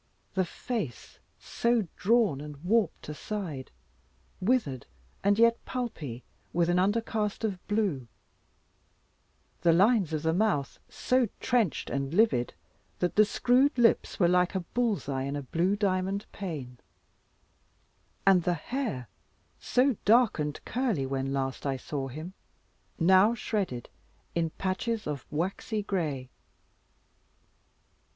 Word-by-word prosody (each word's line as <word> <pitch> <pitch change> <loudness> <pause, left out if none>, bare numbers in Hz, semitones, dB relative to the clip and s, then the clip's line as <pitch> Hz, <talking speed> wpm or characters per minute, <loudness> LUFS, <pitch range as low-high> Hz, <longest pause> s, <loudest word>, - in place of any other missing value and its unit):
The 190 -1 +1
face 185 - -5 0.2
so 235 -4 0
drawn 210 - +2
and 150 -1 -8
warped 215 -2 +1
aside, 155 -3 -5 0.7
withered 185 - 0 0.4
and 200 +1 +3
yet 230 +1 +4
pulpy, 155 - -5 0.3
with 170 0 +2
an 175 - +3
undercast 210 +2 0
of 195 -5 -2
blue; 200 - 0 1.5
the 170 - +5
lines 195 0 +4
of 155 -1 -2
the 160 0 +2
mouth 180 -8 0
so 255 -3 +1
trenched 240 - 0
and 140 +3 -2
livid, 205 - +3 0.4
that 180 - -1
the 215 - +7
screwed 255 +6 +3
lips 235 -2 +3
were 175 - +5
like 180 +1 +2
a 190 - +1
bull's 225 - -1
eye 135 -2 -1
in 140 +2 -3
a 145 - -4
blue 175 +9 +1
diamond 195 0 0
pane; 145 - -6 1.5
and 190 -2 +6
the 175 +1 +1
hair, 170 - -3 0.5
so 255 -2 +2
dark 230 -2 +4
and 150 0 -3
curly 235 - 0
when 135 0 -2
last 135 -1 -2
I 135 -2 -1
saw 135 +1 -4
him, 155 +8 -7 0.6
now 190 +6 +5
shredded 195 - -2 0.5
in 165 -1 0
patches 195 +6 -2
of 145 -4 -4
waxy 195 +6 -2
gray. 150 -10 -2
185 Hz, 125 wpm, -29 LUFS, 150-220 Hz, 1.5 s, the